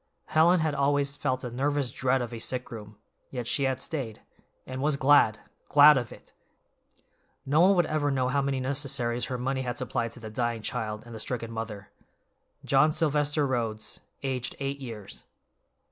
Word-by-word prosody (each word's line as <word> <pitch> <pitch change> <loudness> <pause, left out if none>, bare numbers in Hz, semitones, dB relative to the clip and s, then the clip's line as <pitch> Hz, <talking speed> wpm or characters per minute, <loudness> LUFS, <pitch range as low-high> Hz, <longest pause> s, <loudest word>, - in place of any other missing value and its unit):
Helen 170 +2 +4
had 155 -2 0
always 140 0 +1
felt 130 -2 -1
a 125 - -4
nervous 140 +1 0
dread 130 -1 +1
of 120 0 -7
a 115 - -5
sick 125 +2 -3
room, 105 -2 -9 0.3
yet 125 -3 -5
she 140 +3 +1
had 130 -1 0
stayed, 130 -7 -4 0.5
and 130 0 -5
was 145 0 +1
glad—glad 145 +2 +5
of 120 -4 -2
it! - - -14 1.1
No 150 +4 +3
one 195 +2 +6
would 175 -2 +3
ever 155 -2 0
know 130 -2 +1
how 140 +2 +1
many 135 -1 -1
necessaries 130 -3 -1
her 125 - -3
money 130 +2 -1
had 125 -1 -3
supplied 120 -2 -2
to - - -11
the 110 -2 -8
dying 115 -1 -2
child 110 -4 -3
and 120 - -11
the 110 - -7
stricken 115 0 -3
mother. 110 -3 -6 0.7
"John 140 +3 +4
Sylvester 150 -1 +1
Rhodes, 115 -5 -2 0.2
aged 130 -2 -2
eight 140 0 -3
years." 105 - -8
130 Hz, 175 wpm, -28 LUFS, 120-145 Hz, 1.1 s, one